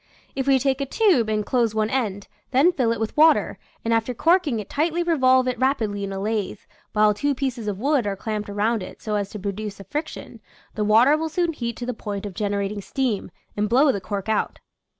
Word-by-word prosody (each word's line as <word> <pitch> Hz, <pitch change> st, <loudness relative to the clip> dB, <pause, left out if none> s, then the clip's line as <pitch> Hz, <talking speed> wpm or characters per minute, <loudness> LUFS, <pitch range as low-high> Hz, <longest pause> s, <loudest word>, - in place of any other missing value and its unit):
If 270 Hz, 0 st, -2 dB
we 270 Hz, -1 st, +5 dB
take 270 Hz, +1 st, 0 dB
a 275 Hz, -, -2 dB
tube 315 Hz, -, +3 dB
and 215 Hz, -1 st, 0 dB
close 235 Hz, -3 st, +1 dB
one 215 Hz, 0 st, 0 dB
end, 205 Hz, -7 st, -2 dB, 0.2 s
then 275 Hz, +7 st, +4 dB
fill 250 Hz, -9 st, +1 dB
it 230 Hz, -, -2 dB
with 220 Hz, -1 st, -3 dB
water, 315 Hz, +1 st, +4 dB, 0.3 s
and 230 Hz, -, +2 dB
after 230 Hz, +2 st, 0 dB
corking 330 Hz, -5 st, +2 dB
it 205 Hz, -, -6 dB
tightly 330 Hz, +3 st, 0 dB
revolve 260 Hz, -6 st, +3 dB
it 250 Hz, -, -2 dB
rapidly 225 Hz, -7 st, 0 dB
in 195 Hz, -, -4 dB
a 195 Hz, -, -4 dB
lathe, 210 Hz, 0 st, -2 dB, 0.4 s
while 210 Hz, 0 st, +4 dB
two 285 Hz, +7 st, -1 dB
pieces 250 Hz, -4 st, -3 dB
of 205 Hz, -2 st, -2 dB
wood 270 Hz, 0 st, +1 dB
are 200 Hz, -, -1 dB
clamped 210 Hz, +1 st, -4 dB
around 210 Hz, +2 st, 0 dB
it 185 Hz, -, -9 dB
so 215 Hz, -, -4 dB
as 205 Hz, -1 st, -1 dB
to 210 Hz, -, -7 dB
produce 205 Hz, +1 st, -5 dB
a -, -, -8 dB
fric 295 Hz, -, -3 dB
tion, -, -, -10 dB, 0.3 s
the 215 Hz, -, -2 dB
water 225 Hz, +7 st, +5 dB
will 320 Hz, +1 st, -2 dB
soon 340 Hz, +1 st, 0 dB
heat 235 Hz, -5 st, -4 dB
to 245 Hz, -, -5 dB
the 250 Hz, -, -2 dB
point 205 Hz, -2 st, -5 dB
of 200 Hz, -, -6 dB
generating 205 Hz, +1 st, -2 dB
steam, 245 Hz, -2 st, -2 dB, 0.3 s
and 210 Hz, 0 st, 0 dB
blow 270 Hz, +5 st, +5 dB
the 200 Hz, -, -4 dB
cork 195 Hz, +1 st, -4 dB
out. 220 Hz, -1 st, -1 dB
225 Hz, 230 wpm, -23 LUFS, 205-270 Hz, 0.4 s, we